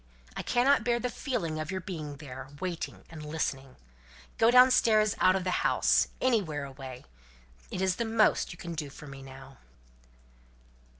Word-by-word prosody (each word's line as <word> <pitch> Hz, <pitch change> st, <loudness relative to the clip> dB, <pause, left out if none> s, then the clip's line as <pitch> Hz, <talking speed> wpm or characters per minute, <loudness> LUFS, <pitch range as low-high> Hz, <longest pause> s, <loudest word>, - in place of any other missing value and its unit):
I -, -, -3 dB
cannot 250 Hz, 0 st, +3 dB
bear 240 Hz, 0 st, +1 dB
the 250 Hz, 0 st, -2 dB
feeling 170 Hz, -, -3 dB
of 155 Hz, 0 st, -4 dB
your 190 Hz, -, -2 dB
being 155 Hz, -6 st, -6 dB
there 135 Hz, -3 st, -9 dB
waiting 175 Hz, -1 st, -5 dB
and 155 Hz, -2 st, -8 dB
listening. 135 Hz, -4 st, -3 dB, 0.6 s
Go 225 Hz, -, +6 dB
downstairs 235 Hz, -4 st, +5 dB
out 185 Hz, 0 st, +5 dB
of 190 Hz, -, -1 dB
the 185 Hz, -, -1 dB
house -, -, +3 dB
anywhere 185 Hz, -, 0 dB
away. 130 Hz, -2 st, -9 dB, 0.6 s
It 185 Hz, -, -3 dB
is 185 Hz, -1 st, +1 dB
the 235 Hz, -, -1 dB
most 225 Hz, -1 st, +2 dB
you 170 Hz, -, -10 dB
can 170 Hz, 0 st, -6 dB
do 150 Hz, -3 st, -4 dB
for 145 Hz, -, -12 dB
me 135 Hz, -1 st, -10 dB
now." 135 Hz, 0 st, -12 dB
170 Hz, 165 wpm, -29 LUFS, 140-225 Hz, 0.6 s, Go